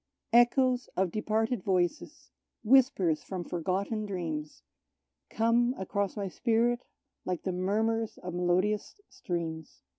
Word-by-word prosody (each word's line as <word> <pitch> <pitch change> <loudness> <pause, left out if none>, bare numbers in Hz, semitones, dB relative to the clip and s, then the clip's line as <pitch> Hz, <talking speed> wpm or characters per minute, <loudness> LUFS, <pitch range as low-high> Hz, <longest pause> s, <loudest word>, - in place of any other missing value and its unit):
Echoes 250 +1 +4
of 185 -2 +1
departed 220 +2 0
voices, 180 -2 -1 0.3
whispers 230 - +4
from 185 -2 -5
forgotten 190 +6 -2
dreams, 160 -6 -5 0.7
Come 235 +2 +2
across 200 +1 -2
my 200 -1 -2
spirit, 235 +4 +1 0.4
like 180 -2 -3
the 190 - -1
murmurs 220 +5 0
of 180 -1 -7
melodious 185 - 0
streams. 165 -3 -5
200 Hz, 110 wpm, -30 LUFS, 180-230 Hz, 0.7 s, Echoes